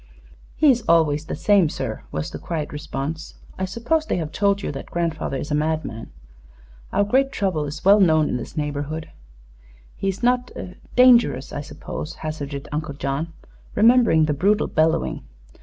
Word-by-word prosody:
"He 300 -3 +5
is 240 -2 0
always 155 -2 +3
the - - -4
same, 200 -6 +3
sir," - - -4
was 75 0 -3
the - - -6
quiet 155 -4 -4
response. 150 +2 -5 0.2
"I 190 - 0
suppose 235 +11 0
they - - 0
have 160 -3 -3
told 200 0 +1
you - - -2
that 135 - -8
grandfather 165 -5 -2
is 145 - -5
a - - +1
madman? 150 -6 -2 0.8
Our - - +2
great 265 +6 +2
trouble 180 -7 -1
is 145 +4 -7
well 200 +2 +7
known 155 -5 +4
in - - -1
this - - -8
neighborhood." 150 +1 -3 0.8
"He 195 - -3
is 195 +4 -3
not 250 0 +2 0.5
dangerous. 240 - +5
I 145 - -3
suppose?" 150 +1 -7
hazarded 145 -2 -5
Uncle 150 -1 -3
John, 140 +4 -3 0.4
remembering 225 -7 +5
the 150 - 0
brutal 200 +8 +2
bellowing. 160 +1 +1
160 Hz, 165 wpm, -22 LUFS, 150-200 Hz, 0.8 s, well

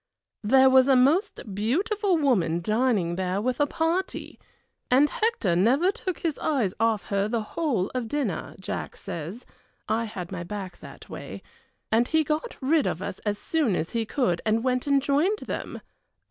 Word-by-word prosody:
There 265 +5 +6
was 260 0 +6
a 270 - +5
most 275 - +2
beautiful 365 - +1
woman 195 - +2
dining 210 -3 +1
there 185 +1 -1
with 250 +3 -1
a 290 - +3
party, 330 +5 -2 0.5
and 270 +4 +5
Hector 430 - 0
never 260 - +3
took 370 -3 -4
his 325 -4 -2
eyes 245 -12 0
off 225 -5 +1
her 200 0 +1
the 225 0 -1
whole 230 - -1
of 250 -3 -2
dinner, 240 - -3
Jack 190 - -5
says 170 +9 -6 0.4
I 230 +1 0
had 185 -5 -7
my 180 -2 -4
back 190 0 -6
that - - -12
way - - -8 0.5
and 235 +2 +3
he 320 0 +2
got 305 +1 -2
rid 295 +3 +2
of 170 - -3
us - - -5
as 205 0 0
soon 285 - 0
as 165 - -2
he 230 -2 -1
could 180 -12 0
and 220 +1 +1
went 255 +1 0
and 280 -1 +3
joined 310 +10 +2
them. - - -5
245 Hz, 175 wpm, -26 LUFS, 200-295 Hz, 0.5 s, There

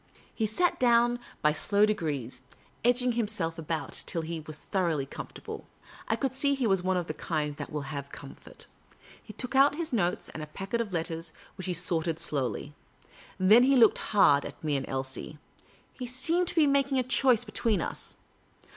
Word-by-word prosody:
He 220 - 0
sat 350 +12 +1
down 240 0 +4 0.2
by 150 - +5
slow 200 +7 +2
degrees, 145 - -2 0.4
edging 245 +1 +3
himself 205 -8 -2
about 160 0 -3
till 165 - -2
he 165 0 -4
was 155 0 -7
thoroughly 165 -6 -1
comfortable. - - -8 0.4
I - - +2
could 270 -2 -1
see 280 +1 +2
he 265 -3 -1
was 195 -4 +2
of 185 -2 0
the 155 - -4
kind 150 -2 -2
that - - -6
will 150 -2 -3
have 140 -1 -5
comfort. 140 -1 -12 0.6
He - - -11
took 250 - -5
out 280 +2 +6
his 320 -3 -3
notes 180 -6 0
and 155 - -7
a 150 - -6
packet 195 +9 -3
of 215 -4 -4
letters, 165 -1 -3 0.2
which 185 -1 -6
he 180 - 0
sorted 165 -1 0
slowly. 145 -1 -3 0.7
Then 205 +6 +7
he 270 +2 +4
looked 230 -4 +6
hard 145 -9 +5
at 145 +2 -9
me 150 -2 0
and 135 -1 -2
at - - -7
Elsie. 135 +3 -5 0.6
He 250 - -6
seemed 325 +9 0
to - - -5
be 320 -3 +5
making 275 -1 +2
his 255 - +1
choice 250 -1 +3
be 215 - -11
tween 215 -2 +1
us. - - -5
190 Hz, 190 wpm, -29 LUFS, 155-245 Hz, 0.7 s, Then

